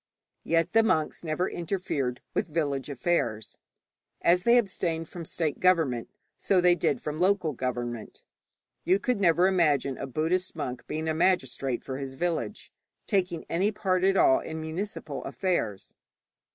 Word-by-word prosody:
Yet 165 +2 +1
the 225 - +6
monks 160 -9 0
never 165 +3 -1
interfered 165 -8 -2
with 205 - 0
village 145 -4 -1
affairs. 125 -6 -1 0.6
As 175 +1 +4
they 235 +5 +5
abstained 170 -7 -1
from 170 -1 -8
state 155 -2 -2
government, 160 -10 +2 0.3
so 190 - +2
they 180 0 +5
did 145 -6 0
from 150 +1 -5
local 180 -4 +2
government. 120 -2 -4 0.6
You 185 - +4
never 200 -7 +2
could - - +5
imagine 145 -6 +2
a - - -4
Buddhist 170 +7 -1
monk 125 -5 -5
being 155 +1 -3
a 160 - +1
magistrate 135 -7 0
for 130 0 -5
his 135 -1 -6
village, 175 +6 -3 0.3
taking 180 -5 0
any 190 +5 +1
part 185 -3 0
at 195 0 +4
all 330 -2 +5
in 160 0 -6
municipal 165 +6 -5
affairs. 115 - -2
165 Hz, 150 wpm, -28 LUFS, 140-185 Hz, 0.6 s, the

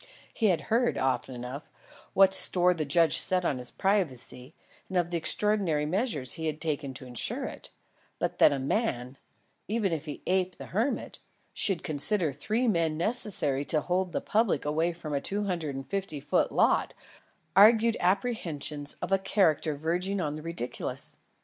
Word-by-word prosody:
He 225 - +1
had 175 -6 +2
heard, 235 +8 +1
often 130 0 -1
enough, 125 +4 -7 0.4
what 190 0 +5
store 180 -1 +5
the 160 -3 -3
judge 165 +3 +2
set 185 -1 +2
on 135 - 0
his 125 - 0
privacy 155 - 0 0.3
and 190 - -2
of 175 -1 0
the 170 - 0
extraordinary 180 -4 +1
measures 155 - +1
he 160 0 -3
had 155 0 -3
taken 145 -4 -3
to 130 - -6
insure 125 -2 -2
it, - - -8 0.5
but - - -3
that - - +7
a 140 - -1
man, 135 - -2 0.5
even 210 -4 0
if 155 -2 -4
he 150 - -8
aped 185 0 0
the - - -8
hermit, 230 +8 -2 0.3
should 195 -4 +1
consider 160 +2 +1
three 220 - -1
men 165 -6 +1
necessary 175 - 0
to 155 0 +1
hold 180 +2 -1
the - - -2
public 220 -5 0
away 160 +3 0
from 165 -3 -7
a 140 - 0
two 205 +6 -2
hundred 170 -8 -3
and 135 0 -7
fifty 195 -4 -4
foot 145 +1 0
lot - - +2 0.6
argued 225 +3 +6
apprehensions 170 - -1
of - - -4
a 195 - +3
character 170 -6 +1
verging 175 +6 -2
on 150 -5 -2
the 155 - -7
ridiculous. 165 -6 -5
170 Hz, 170 wpm, -28 LUFS, 145-195 Hz, 0.6 s, that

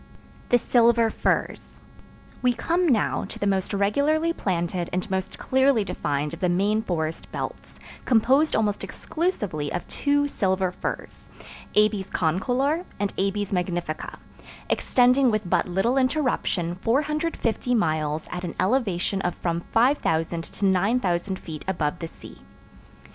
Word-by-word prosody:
The 245 - +5
Silver 235 -1 +3
Firs - - 0 0.8
We 250 -1 +3
come 340 +9 0
now 235 -8 +2
to - - -8
the - - -2
most 195 -2 0
regularly 285 +12 +1
planted 175 - -2
and 185 +4 -2
most 190 +1 -2
clearly 265 -3 +3
defined 150 -5 -2
of 165 - -7
the 180 -2 +1
main 200 +5 +2
forest 165 -6 -3
belts, - - -6 0.2
composed 265 +6 +3
almost 210 -2 0
exclusively 205 - -3
of 175 - -4
two 285 0 +1
Silver 190 -7 0
Firs—Abies 210 +2 -3
concolor 250 - 0 0.2
and 205 -1 -1
Abies 200 +1 -1
magnifica—extending 185 - 0
with 215 -4 -1
but - - +1
little 195 +9 +1
interruption 255 - 0
450 285 -2 0
miles 155 -6 0
at 180 0 -4
an 170 - -5
elevation 195 -3 +1
of 180 - -1
from 170 -1 -2
5000 170 - +2
to 200 - -4
9000 190 -1 +1
feet 155 -4 -8
above 170 -3 -1
the 165 - -4
sea. - - -14
200 Hz, 125 wpm, -25 LUFS, 175-250 Hz, 0.8 s, The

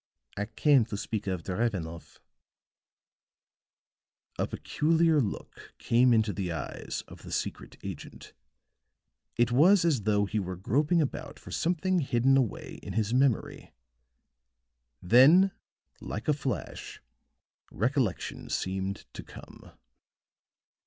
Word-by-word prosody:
I 105 - -2
came 140 -1 +4
to 105 -2 -5
speak 105 -1 -4
of 90 -3 -2
Drevenoff." 90 -5 -3 2.2
A - - +1
peculiar 160 0 +2
look 105 -6 -6
came 125 +2 +3
into 110 -3 +2
the 95 -3 -3
eyes 80 -4 -5
of - - -13
the - - -10
secret - - -4
agent; - - -9 1.0
it 120 0 +2
was 170 +8 +5
as 150 -9 +2
though 105 0 +2
he 105 +2 -2
were 95 -2 -4
groping 150 - +1
about 140 +1 -6
for - - -12
something 180 +2 0
hidden 135 -2 +2
away 130 -6 -1
in - - -7
his 110 0 0
memory; 130 -3 0 1.3
then 145 - +6 0.5
like 110 - -6
a 150 - +4
flash, 135 -3 -5 0.7
recollection 120 - -1
seemed 95 +1 -3
to - - -7
come. - - -13
120 Hz, 115 wpm, -29 LUFS, 100-145 Hz, 2.2 s, then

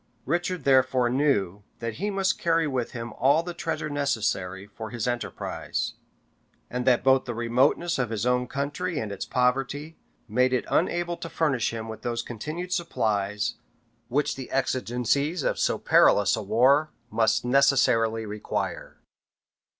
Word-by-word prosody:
Richard 175 +4 -1
therefore 130 -2 +3
knew 105 -9 +1 0.2
that 115 -1 -5
he 205 - 0
must 195 -1 0
carry 165 -1 +2
with 130 -5 -2
him 115 -2 -6
all 140 +6 +3
the 175 0 -5
treasure 165 -2 -3
necessary 110 -10 -1
for 110 +2 -8
his 120 0 -3
enterprise, 120 -6 -3 0.8
and 125 +1 -3
that 125 -2 +4
both 130 0 +4
the 120 - -4
remoteness 130 +8 +1
of 125 -3 0
his 110 0 -2
own 125 0 +1
country 145 +5 -3
and 110 -6 -3
its 100 - -5
poverty, 135 +5 -1 0.3
made 125 +4 +2
it 125 - 0
unable 175 0 +1
to 165 - -7
furnish 140 -10 0
him 115 -1 -5
with 110 -1 -8
those 120 -1 -2
continued 155 +10 -5
supplies, 105 - -1 0.5
which 145 +4 0
the 130 -2 -7
exigencies 135 +4 0
of - - 0
so - - +1
perilous 100 -2 +4
a 110 - -4
war 130 +9 +3 0.2
must 110 +1 +2
necessarily 120 -4 +3
require. 105 0 -4
125 Hz, 150 wpm, -26 LUFS, 115-145 Hz, 0.8 s, that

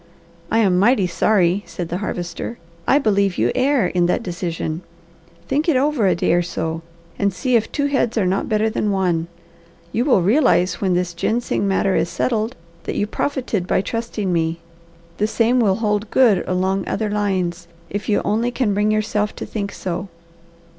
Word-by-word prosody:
"I 225 - +1
am 190 -5 +3
mighty 210 -1 +4
sorry," 180 +1 +2
said 170 0 -5
the 175 - -2
Harvester. 180 +3 -4 0.3
"I 275 - +5
believe 200 -7 +1
you - - +2
err 265 -3 +2
in 175 -1 +1
that 180 - 0
decision. 170 -3 -3 0.7
Think 295 +5 +1
it 310 - +3
over 275 -6 +2
a 180 - +3
day 170 - +1
or 175 - +3
so, 165 -1 -3 0.4
and 200 0 +2
see 250 +7 0
if 225 -1 +1
two 285 - 0
heads 265 -5 0
are 205 - +2
not 190 +5 0
better 215 0 +2
than 215 -1 -1
one. 180 -4 0 0.6
You 230 - +1
will 245 - +4
realize 200 - +3
when 190 -3 +2
this 180 -1 -1
ginseng 220 +3 -1
matter 195 0 +1
is 170 - +1
settled 225 +1 -1 0.3
that - - -3
you - - +1
profited 220 -5 -2
by - - +2
trusting 220 -3 -3
me. 165 0 0 0.6
The 210 - +1
same 230 +3 +2
will 200 -5 +3
hold 210 -1 -1
good 240 -7 +4
along 190 +1 0
other 215 -2 -1
lines, 185 -4 -1 0.2
if 205 0 -4
you 205 - +2
only 225 +4 +1
can 245 -4 0
bring 210 +1 +1
yourself 215 -1 0
to - - -5
think 200 -2 -4
so. 185 +1 -4
205 Hz, 180 wpm, -20 LUFS, 180-230 Hz, 0.7 s, I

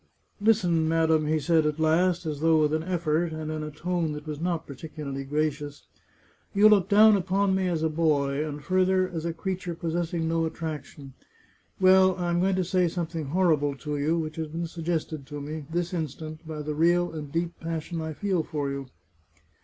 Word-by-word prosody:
" - - -45
Listen, 180 -7 +3
madam," 160 -1 +2
he 155 +1 +2
said 160 +2 +3
at 150 0 -1
last, 170 +3 +2
as 150 -2 -3
though 160 0 +4
with 150 0 +1
an 155 - +1
effort, 170 -1 0
and 155 0 -4
in 155 0 -3
a 155 - -4
tone 165 +1 -2
that 150 0 -7
was 150 -1 -5
not 170 -2 -1
particularly 140 -1 -6
gracious. 145 0 -2 0.4
" - - -35
You 210 +2 +7
look 200 -2 +4
down 215 +1 +7
upon 195 +1 +1
me 190 -1 +1
as 165 -3 -1
a - - +3
boy, 150 -3 +1
and 150 -1 -6
further, 185 0 +2
as 165 -2 -5
a 170 - 0
crea 190 +3 -2
ture 175 -2 -5
possessing 165 0 -2
no 165 0 +1
attraction. 150 -4 -7 0.7
Well, 185 0 +6
I 175 -1 -2
am 175 - +1
going 190 +1 +2
to 185 - +1
say 180 0 +2
something 165 -2 -3
horrible 150 -3 +2
to 150 +2 -4
you, 150 +4 +1
which 155 -1 -4
has 160 -1 -2
been 165 +3 -4
suggested 160 -4 -3
to 145 +1 -6
me, 150 0 -6
this 175 +2 -2
instant, 155 0 -5
by 155 -2 -5
the 150 0 -3
real 175 +3 +2
and 150 -3 -6
deep 170 +1 -2
passion 165 0 -4
I 160 0 -4
feel 190 +1 0
for 150 -3 -3
you. 140 -1 -5
160 Hz, 205 wpm, -27 LUFS, 150-175 Hz, 0.7 s, You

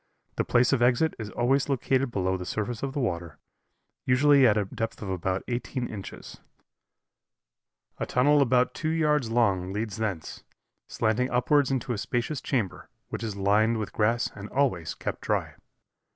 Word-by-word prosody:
"The - - +2
place 125 +3 +3
of 130 - +1
exit 125 +6 +3
is 110 -2 -5
always 135 +5 +1
located 135 0 +1
below 95 -4 0
the 90 - -4
surface 110 +5 -3
of 135 -1 -3
the 145 - -2
water, 85 - -3 0.7
usually 140 +1 +5
at 105 - +3
a 105 - +1
depth 115 +3 -5
of 95 - -4
about 95 +1 -2
eighteen 125 +1 -3
inches; 100 -3 -9 1.6
a - - -2
tunnel 145 +3 +4
about 125 -1 +3
two 155 - -2
yards 150 -6 +1
long 100 -6 +1
leads 105 +1 -3
thence, 100 -8 -4 0.4
slanting 115 +3 0
upwards 140 +3 +2
into 130 -2 -1
a 105 - -4
spacious 125 +5 -2
chamber, 115 -9 -2 0.2
which - - -5
is 110 -3 -4
lined 105 +4 +2
with 105 -2 -4
grass 115 +2 +1
and 100 +1 -9
always 125 - 0
kept - - -5
dry. - - -1
120 Hz, 165 wpm, -27 LUFS, 105-130 Hz, 1.6 s, usually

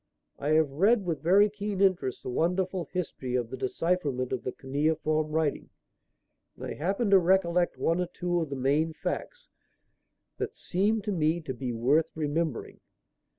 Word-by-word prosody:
I 145 - -2
have 155 -3 +3
read 200 +8 +3
with 165 -4 -2
very 195 +5 +5
keen 205 -1 -4
interest 185 -10 +1
the - - -4
wonderful 180 +4 0
history 145 -8 -4
of 120 -2 -1
the - - -3
decipherment 135 -1 -1
of 130 - -2
the 125 - -3
cuneiform 155 +3 0
writing, 155 -2 -1 0.9
and - - -8
I - - -4
happen 195 +7 -1
to 195 - +8
recollect 175 -1 +2
one 165 +2 +1
or 180 - -1
two 175 0 -1
of 160 - -3
the 140 - -4
main 145 +5 +1
facts - - -5 0.9
that - - -3
seemed 205 +4 0
to 210 - -2
me 165 -2 +1
to 140 -5 -5
be 125 0 -4
worth 130 +8 +2
remembering. 155 -2 -2
160 Hz, 165 wpm, -28 LUFS, 140-185 Hz, 0.9 s, to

